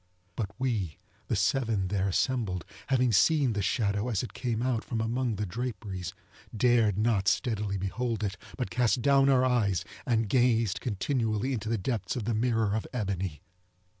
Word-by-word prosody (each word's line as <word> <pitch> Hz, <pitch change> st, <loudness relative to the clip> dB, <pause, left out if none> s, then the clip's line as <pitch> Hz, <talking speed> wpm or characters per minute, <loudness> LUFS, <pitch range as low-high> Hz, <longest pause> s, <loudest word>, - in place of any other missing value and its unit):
But 105 Hz, -2 st, -2 dB
we, 105 Hz, -, -1 dB, 0.3 s
the -, -, 0 dB
seven 100 Hz, 0 st, +1 dB
there 100 Hz, 0 st, 0 dB
assembled, 95 Hz, -, 0 dB, 0.2 s
having 130 Hz, -2 st, +3 dB
seen 135 Hz, +3 st, +4 dB
the 105 Hz, -, -1 dB
shadow 105 Hz, +2 st, 0 dB
as 110 Hz, -2 st, 0 dB
it 125 Hz, -, -7 dB
came 120 Hz, -2 st, -2 dB
out 125 Hz, -3 st, 0 dB
from 115 Hz, -, -3 dB
among 115 Hz, +1 st, 0 dB
the 105 Hz, +1 st, -2 dB
draperies, 100 Hz, -4 st, -5 dB, 0.4 s
dared 115 Hz, -4 st, +3 dB
not 105 Hz, -3 st, +1 dB
steadily 105 Hz, -2 st, 0 dB
behold 110 Hz, +3 st, -2 dB
it, 100 Hz, -1 st, -1 dB, 0.2 s
but 125 Hz, -, -3 dB
cast 120 Hz, -1 st, +2 dB
down 140 Hz, 0 st, +5 dB
our 130 Hz, -1 st, +4 dB
eyes, 105 Hz, -7 st, +1 dB, 0.2 s
and 115 Hz, -3 st, +1 dB
gazed 115 Hz, -3 st, +2 dB
continually 115 Hz, +1 st, -1 dB
into 110 Hz, -3 st, -3 dB
the 115 Hz, -, +1 dB
depths 110 Hz, +3 st, -2 dB
of 120 Hz, -, -2 dB
the 115 Hz, +2 st, -1 dB
mirror 110 Hz, -2 st, +1 dB
of 110 Hz, -, -2 dB
ebony. 95 Hz, -, -3 dB
110 Hz, 165 wpm, -29 LUFS, 100-125 Hz, 0.4 s, down